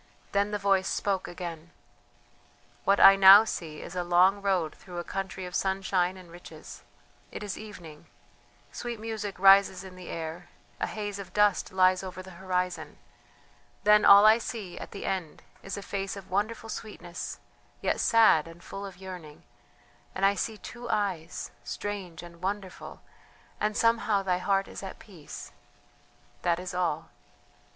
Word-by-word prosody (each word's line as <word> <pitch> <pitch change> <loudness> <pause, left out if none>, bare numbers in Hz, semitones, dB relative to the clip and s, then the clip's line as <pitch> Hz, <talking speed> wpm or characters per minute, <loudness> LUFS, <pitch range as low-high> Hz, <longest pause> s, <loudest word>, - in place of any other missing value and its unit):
Then 200 +1 +1
the 210 - -1
voice 195 -1 +2
spoke 195 -2 -1
again: 170 -2 -7 1.2
"What 200 +1 +4
I 195 - +9
now 195 +2 +10
see 165 -8 -6
is 180 - -9
a 180 - -1
long 180 +3 +4
road 185 -6 0
through 180 -2 -11
a 175 - -3
country 190 0 -5
of 180 - -8
sunshine 190 -1 0
and 180 -2 -14
riches 165 -2 -12 0.5
it - - -7
is 205 -2 -4
evening, 175 -8 -11 0.6
sweet 240 -2 -5
music 215 -2 -5
rises 195 -1 +6
in 190 -1 -11
the 185 -1 -10
air, 165 +2 -6 0.3
a - - -1
haze 205 -2 -5
of 190 -2 -9
dust 210 -2 +2
lies 185 0 +4
over 185 -1 -7
the 190 - -12
horizon; 180 -1 -2 0.9
then 210 +1 +6
all 200 +1 +9
I 220 +2 +7
see, 215 -6 -6
at - - -8
the 200 - -7
end, 180 -5 -4 0.2
is 195 0 -6
a 200 - -6
face 195 0 -4
of 195 -2 -11
wonderful 220 +3 -2
sweetness, 180 -6 -7 0.4
yet - - 0
sad 220 -9 +5
and 165 +1 -13
full 200 - -7
of 190 -2 -12
yearning 180 -5 -10 0.7
and 190 - +1
I 200 - +5
see 215 +2 -3
two 240 +3 -9
eyes... 185 -6 -2
strange 185 -5 -5
and 170 0 -13
wonderful, 190 0 -5 0.6
and 210 0 0
somehow 230 -3 +2
thy 180 -2 0
heart 195 +1 +1
is - - -8
at 190 -1 -7
peace.... 175 -8 -11 0.9
That 170 -1 +1
is 185 +1 -6
all." 175 -4 -1
190 Hz, 160 wpm, -28 LUFS, 180-205 Hz, 1.2 s, now